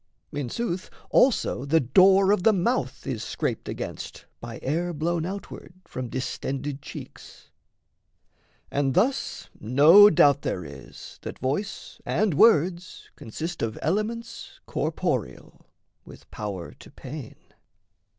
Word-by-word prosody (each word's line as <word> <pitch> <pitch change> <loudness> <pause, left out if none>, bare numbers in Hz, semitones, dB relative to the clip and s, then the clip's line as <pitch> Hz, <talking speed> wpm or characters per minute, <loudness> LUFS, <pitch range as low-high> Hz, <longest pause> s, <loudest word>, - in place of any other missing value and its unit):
In 140 -4 -4
sooth, 190 - -3 0.2
Also 250 - +3
the 155 +4 +3
door 190 +9 +5
of 205 - +2
the 220 +4 +5
mouth 195 - -1
is 120 -5 -3
scraped - - -3
against - - -6
[By 115 -1 -8
air 170 +6 -1
blown 165 +2 -1
outward] 195 -2 -8
from 125 -2 -6
distended 135 +2 -4
[cheeks]. - - -11 1.2
And 140 -1 0
thus 250 +9 0
no 150 - +7
doubt 145 -6 +4
there 90 - -3
is, 70 -2 -11
that - - -7
voice 150 - -4
and 210 -4 +1
words 180 0 +2
Consist 160 +9 -6
of 110 -1 -2
elements 220 +6 -3
corporeal, - - -3 0.4
With - - -15
power 100 -5 -5
to - - -13
pain. 135 -2 -9
160 Hz, 120 wpm, -25 LUFS, 130-195 Hz, 1.2 s, no